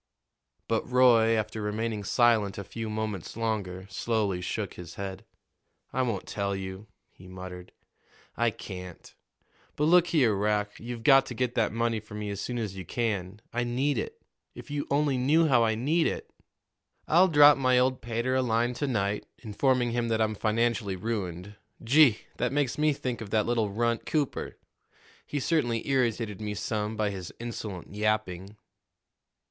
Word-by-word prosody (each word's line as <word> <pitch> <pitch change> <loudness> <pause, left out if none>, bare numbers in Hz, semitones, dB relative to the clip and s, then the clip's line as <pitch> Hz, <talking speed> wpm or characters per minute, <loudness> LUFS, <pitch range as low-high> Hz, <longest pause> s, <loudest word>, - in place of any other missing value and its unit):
But 115 +1 -1
Roy, 120 -3 +5
after 110 0 -3
remaining 105 0 -2
silent 110 -3 +3
a 100 - -4
few 115 +3 -6
moments 105 -3 -4
longer, 100 -5 -2
slowly 100 -1 -1
shook 100 +2 -3
his 90 -1 -10
head. 95 -1 -6 0.7
"I 130 - +1
won't 115 -7 -1
tell 100 -1 -2
you," 95 +2 -6 0.3
he 90 - -15
muttered; 90 -1 -9 0.6
"I 120 0 +2
can't. 90 -4 -9 0.6
But 150 - -1
look 175 +2 +5
here, 130 -11 +3
Rack, 105 +1 -1
you've 120 0 -6
got 135 +2 +6
to 125 - -6
get 125 0 -1
that 115 -3 +1
money 115 0 0
for 105 0 -11
me 105 -1 -4
as 100 - -4
soon 125 - -3
as 105 -5 -3
you 95 - -6
can. 105 -1 -2
I 120 +1 0
need 125 +2 0
it - - -5 0.4
if - - -10
you 145 0 -2
only 140 -2 +2
knew 155 +6 +4
how 125 -5 +4
I 110 -1 +2
need 155 +9 +2
it!" - - -4 0.8
"I'll 175 +4 +6
drop 145 -3 +7
my 130 -1 +3
old 130 +1 +2
pater 120 +2 -1
a 130 - +3
line 120 0 +1
to 145 +4 -2
night, 105 -4 -1 0.2
informing 120 +2 +1
him 120 0 0
that 110 -1 0
I'm 110 -1 +1
financially 110 -1 0
ruined. 95 -1 -4 0.3
Gee! 130 -1 +5 0.2
that 125 0 0
makes 140 -3 0
me 150 0 +3
think 125 -4 -4
of 110 - -7
that 105 0 +2
little 115 -3 +1
runt, 115 +3 -1
Cooper! 150 -4 -2 0.7
He 145 - -2
certainly 125 -7 0
irritated 115 -6 0
me 105 -1 -3
some 105 +1 -2
by 105 -2 0
his 95 -3 -6
insolent 110 -6 -6
yapping." 105 -2 -1
115 Hz, 170 wpm, -28 LUFS, 105-125 Hz, 0.8 s, drop